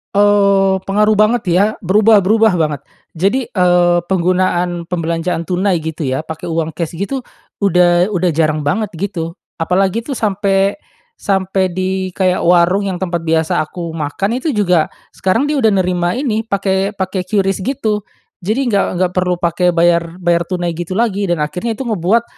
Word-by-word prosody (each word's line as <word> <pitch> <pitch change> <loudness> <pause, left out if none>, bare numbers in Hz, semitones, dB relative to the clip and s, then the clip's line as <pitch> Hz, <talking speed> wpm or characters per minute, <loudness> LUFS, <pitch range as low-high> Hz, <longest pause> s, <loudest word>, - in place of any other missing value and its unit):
Oh, 200 -1 +4
pengaruh 210 +2 +2
banget 215 +3 +3
ya 180 +4 +4 0.2
berubah 210 +3 +4
berubah 220 +2 +3
banget 150 -5 -1 0.3
jadi, 215 +9 0
eee, 175 -2 +3
penggunaan 180 -1 0
pembelanjaan 170 0 -2
tunai 180 +1 0
gitu 160 -1 -4
ya 130 +1 -1
pakai 160 0 -8
uang 165 -1 -1
cash 165 +1 -5
gitu, 235 +9 -4 0.3
udah 180 0 +3
udah 180 -1 +1
jarang 155 -1 0
banget 200 +8 -1
gitu, 170 -2 -4 0.2
apalagi 190 +6 0
tuh 280 - -4
sampai 200 -3 0 0.4
sampai 190 -1 0
di 185 0 -2
kayak 185 -1 0
warung 180 +3 +3
yang 190 -2 -3
tempat 170 -3 -2
biasa 160 0 +1
aku 170 +2 -7
makan 165 +8 -2
itu 295 +3 -2
juga 180 -7 +2 0.3
sekarang 225 +10 +1
dia 300 - 0
udah 225 -5 +3
nerima 175 -1 0
ini 235 -5 -1
pakai 195 -1 -1
pakai 190 -1 -3
QRIS 195 0 0
gitu. 220 -6 -1 0.4
Jadi 230 +8 0
gak 200 -4 +2
gak 185 -1 +1
perlu 180 -1 0
pakai 175 +1 +1
bayar 170 0 +1
bayar 170 -1 +1
tunai 175 -1 -3
gitu 175 +2 -6
lagi 205 -4 0
dan 170 - 0
akhirnya 180 +9 -2
itu 265 - -4
ngebuat, 215 +2 +1
185 Hz, 160 wpm, -16 LUFS, 170-205 Hz, 0.4 s, Oh